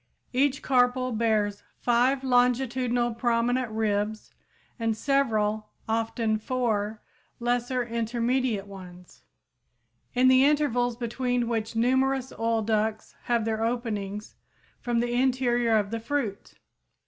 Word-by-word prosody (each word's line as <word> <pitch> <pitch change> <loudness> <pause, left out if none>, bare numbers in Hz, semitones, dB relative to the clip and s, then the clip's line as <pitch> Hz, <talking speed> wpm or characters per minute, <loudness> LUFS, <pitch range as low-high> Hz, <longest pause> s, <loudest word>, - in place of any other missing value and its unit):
Each 270 +1 +1
carpel 255 0 +2
bears 215 -3 0 0.2
five 250 +3 +2
longitudinal 245 -1 +1
prominent 240 +1 0
ribs 215 0 -2 0.5
and 225 -1 0
several, 220 -6 0 0.2
often 225 0 0
four, 220 -3 -1 0.4
lesser 245 +1 0
intermediate 235 -1 -1
ones, 180 -3 -12 0.9
in 255 +1 +4
the 260 0 +6
intervals 275 -5 +2
between 245 0 -1
which 225 -1 -2
numerous 260 +2 +1
oil 225 -1 +1
ducts 220 0 -1
have 235 -2 +1
their 220 0 -1
openings 210 -4 -3 0.5
from 240 -1 0
the 240 0 -1
interior 245 -2 +2
of 205 -1 -1
the 230 - -2
fruit. 230 -4 -3
235 Hz, 110 wpm, -27 LUFS, 220-250 Hz, 0.9 s, the